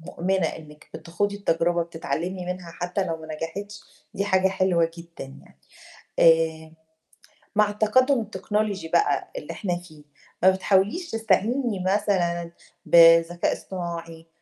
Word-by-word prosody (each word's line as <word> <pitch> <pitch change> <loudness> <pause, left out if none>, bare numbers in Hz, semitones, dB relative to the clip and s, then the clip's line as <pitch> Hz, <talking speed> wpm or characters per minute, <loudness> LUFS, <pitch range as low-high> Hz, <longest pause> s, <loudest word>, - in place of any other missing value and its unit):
مؤمنة 180 +2 -1
إنِّك 150 -1 -9
بتخوضي 175 +6 -3
التجربة، 170 -3 +1
بتتعلّمي 170 +2 -4
منها 180 -2 -5
حتى 180 +3 -3
لو 165 -3 -3
ما 160 -1 -11
نجحِتش، 200 +6 -6 0.3
دي 200 - -1
حاجة 190 -1 +2
حلوة 185 -3 +1
جدًا 170 -3 -10
يعني. 135 - -16 0.6
آآ 160 -1 +3 0.8
مع 210 0 +4
التقدّم 230 +5 +2
التكنولوجي 205 -3 -3
بقى 415 - +1
اللي - - -6
إحنا 180 -5 -3
فيه، 155 -4 -14 0.4
ما 190 - +8
بتحاوليش 195 - 0
تستعيني 225 0 0
مثلًا 180 -4 0 0.3
بذكاء 165 +1 +5
اصطناعي، 170 -3 -7
180 Hz, 120 wpm, -24 LUFS, 165-205 Hz, 0.8 s, ما